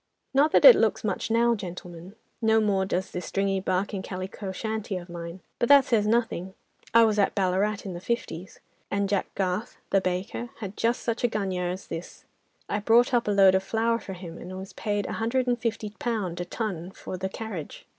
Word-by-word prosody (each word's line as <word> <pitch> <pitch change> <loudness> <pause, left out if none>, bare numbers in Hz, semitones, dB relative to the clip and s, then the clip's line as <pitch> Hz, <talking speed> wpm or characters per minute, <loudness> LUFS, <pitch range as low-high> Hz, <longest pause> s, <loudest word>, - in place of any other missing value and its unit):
"Not 290 +3 +4
that - - +5
it - - +12
looks - - +1
much - - -2
now, 235 +1 +4
gentlemen; 180 -2 -7 0.3
no 220 0 +4
more 200 -3 +2
does 185 0 -2
this 180 - -5
stringy 195 0 0
bark 190 +2 -1
and 190 -2 -3
calico 190 +1 -5
shanty 215 0 -3
of 175 0 -9
mine. 170 +1 -7 0.2
But 240 - +1
that 280 -1 +8
says 215 -4 +2
nothing. 215 -5 0 0.4
I 230 0 +7
was 215 -2 +2
at 200 - +2
Ballarat 200 +2 +1
in 190 - -4
the 175 - -7
'fifties,' 190 -5 -4 0.3
and 200 0 0
Jack 200 -1 0
Garth, 190 +3 -2
the 195 - +4
baker, 185 +6 -3
had 200 -2 -6
just 235 +2 0
such 230 0 -2
a - - +5
gunya 190 -5 -2
as 185 +1 -6
this. 165 +2 -8 0.4
I 205 - -1
brought 235 +5 +4
up 235 -2 +2
a - - +2
load 195 -2 +6
of 190 - +3
flour 230 +3 +1
for 195 - -7
him, 175 -2 -9
and 185 +1 -7
was 190 +1 -8
paid 205 -1 -2
a - - -4
hundred 250 +3 +1
and 245 -1 0
fifty 225 -2 -2
pound 200 -8 -2
a - - -3
ton 180 -3 -4
for 190 - -7
the 190 +1 -3
carriage. 195 -7 -7
200 Hz, 210 wpm, -27 LUFS, 185-225 Hz, 0.4 s, it